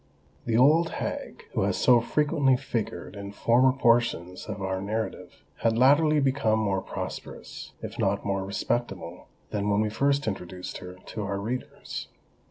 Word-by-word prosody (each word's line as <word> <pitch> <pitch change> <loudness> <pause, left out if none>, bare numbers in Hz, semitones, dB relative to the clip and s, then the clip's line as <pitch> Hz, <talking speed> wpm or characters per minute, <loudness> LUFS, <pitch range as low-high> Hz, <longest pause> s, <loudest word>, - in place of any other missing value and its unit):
The 115 - +2
Old 155 +6 +5
Hag, - - -5
who - - 0
has - - +1
so 120 -2 +5
frequently 145 0 +2
figured 120 -5 -4
in 100 0 -7
former 125 +5 +4
portions 115 -8 +1
of - - -5
our 95 -1 -2
narrative, 110 +3 -4
had 115 0 +1
latterly 145 +4 +5
become 135 -5 +2
more 100 -3 0
prosperous, - - -7
if - - -6
not 100 +1 +1
more 100 -1 0
respectable, 95 -2 -3 0.2
than 105 -1 -1
when 100 0 +3
we 110 0 +1
first 140 +5 +1
introduced 90 -3 -5
her 90 0 -9
to 90 +4 -7
our 100 -1 -2
readers. 120 +5 -5
110 Hz, 155 wpm, -27 LUFS, 100-130 Hz, 0.2 s, Old